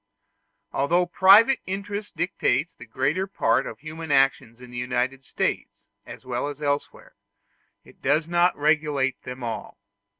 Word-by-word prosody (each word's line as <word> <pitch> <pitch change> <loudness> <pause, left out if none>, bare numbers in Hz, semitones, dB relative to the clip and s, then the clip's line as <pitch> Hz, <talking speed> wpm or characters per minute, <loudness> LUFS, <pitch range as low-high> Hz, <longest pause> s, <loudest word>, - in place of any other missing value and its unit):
Although 170 +6 +2
private 200 +8 +6
interest 200 +2 -5
directs 170 -4 0
the 120 - -13
greater 140 - -1
part 115 -11 +1
of 110 - -7
human 160 0 -7
actions 135 -3 +2
in 125 -1 -13
the 120 - -8
United 125 +2 -2
States 125 - -3 0.2
as 120 - -11
well 125 +2 -2
as 145 -1 -7
elsewhere, 145 -1 -3 0.7
it - - -19
does 150 +4 +1
not 175 +1 +2
regulate 145 -3 +1
them 125 0 -8
all. 115 -3 -5
145 Hz, 140 wpm, -24 LUFS, 125-175 Hz, 0.7 s, private